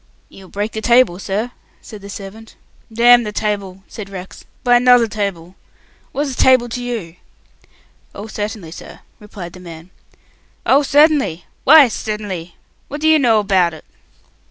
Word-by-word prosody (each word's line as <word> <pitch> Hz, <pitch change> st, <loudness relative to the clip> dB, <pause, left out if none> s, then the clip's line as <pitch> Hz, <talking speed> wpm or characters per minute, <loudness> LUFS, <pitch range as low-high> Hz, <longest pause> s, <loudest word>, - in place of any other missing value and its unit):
"You'll 190 Hz, -1 st, -15 dB
break 205 Hz, +2 st, -4 dB
the 220 Hz, -, -5 dB
table, 235 Hz, -6 st, +3 dB
sir," 210 Hz, +5 st, -3 dB, 0.3 s
said 215 Hz, -3 st, -12 dB
the 200 Hz, -, -11 dB
servant. 205 Hz, +3 st, -10 dB, 0.4 s
"Damn 240 Hz, +2 st, +5 dB
the 210 Hz, -2 st, -5 dB
table!" 200 Hz, -3 st, -4 dB
said 205 Hz, -3 st, -9 dB
Rex. 190 Hz, -1 st, -10 dB, 0.2 s
"Buy 245 Hz, -1 st, +4 dB
'nother 245 Hz, -1 st, +5 dB
table. 200 Hz, -5 st, -5 dB, 0.6 s
What's 280 Hz, -2 st, -3 dB
table 255 Hz, -2 st, +4 dB
t'you?" 235 Hz, -8 st, -6 dB, 1.0 s
"Oh, 200 Hz, -, -7 dB
certainly, 210 Hz, -5 st, -6 dB
sir," -, -, -12 dB, 0.2 s
replied 195 Hz, -5 st, -10 dB
the 185 Hz, -, -12 dB
man. 170 Hz, 0 st, -12 dB, 0.7 s
"Oh, 275 Hz, +2 st, +4 dB
c'ert'nly! 290 Hz, -, +2 dB, 0.2 s
Why 295 Hz, -1 st, +8 dB
c'ert'nly? 205 Hz, -7 st, -6 dB, 0.3 s
What 290 Hz, +2 st, -7 dB
do 315 Hz, -, +1 dB
you 315 Hz, -1 st, +5 dB
know 235 Hz, -5 st, +3 dB
about 190 Hz, -5 st, +1 dB
it?" -, -, -15 dB
210 Hz, 145 wpm, -17 LUFS, 190-245 Hz, 1.0 s, Why